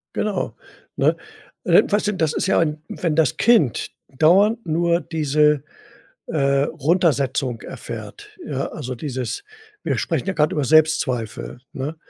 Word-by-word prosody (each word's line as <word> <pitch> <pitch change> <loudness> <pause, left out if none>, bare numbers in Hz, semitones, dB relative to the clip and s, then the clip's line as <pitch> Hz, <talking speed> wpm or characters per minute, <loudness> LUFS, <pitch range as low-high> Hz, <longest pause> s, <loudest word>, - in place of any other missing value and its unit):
Genau, 210 -2 -2 0.4
ne? - - +2 0.5
Äh, - - +5
weißt 210 0 0
du, 210 - +1
das 160 -5 0
ist - - -1
ja - - +3
ein 155 -2 0
wenn 165 -4 -2
das 160 -4 +2
Kind 195 - +3 0.3
dauernd 200 +8 +4
nur 170 +1 +1
diese, 150 -2 +1 0.6
äh, 140 -2 +1
Runtersetzung 140 -6 0
erfährt, 415 0 -8
ja, 135 0 -3
also 130 -4 -6
dieses 130 - -4 0.4
wir - - 0
sprechen - - -2
ja 195 - 0
grad 150 -3 +1
über 150 - 0
Selbstzweifel, 135 -8 +1
ne? 145 +5 -5
155 Hz, 140 wpm, -21 LUFS, 140-170 Hz, 0.6 s, Äh